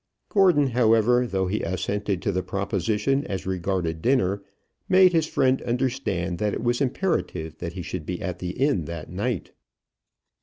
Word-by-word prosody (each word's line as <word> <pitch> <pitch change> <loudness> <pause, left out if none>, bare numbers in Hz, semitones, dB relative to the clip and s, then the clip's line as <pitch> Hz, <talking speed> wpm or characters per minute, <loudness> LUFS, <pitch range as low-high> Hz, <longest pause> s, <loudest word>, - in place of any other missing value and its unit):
Gordon, 180 -8 +4
however, 120 +1 +3
though 95 -3 0
he 100 +4 -1
assented 95 +2 -2
to - - +1
the 95 - 0
proposition 105 +7 0
as 95 -3 -4
regarded 90 -3 -2
dinner, 100 -6 +2 0.5
made 185 -1 +6
his 160 -2 +2
friend 130 -3 +2
understand 120 -9 -1
that 105 -1 0
it - - -4
was 120 +2 +1
imperative 120 - -1
that 85 -1 -5
he 90 - -5
should 85 -2 -5
be 90 -1 -3
at 90 -2 -4
the 90 - -4
inn 135 - +2
that 85 -1 -7
night. 105 +2 -2
100 Hz, 160 wpm, -25 LUFS, 90-125 Hz, 0.5 s, made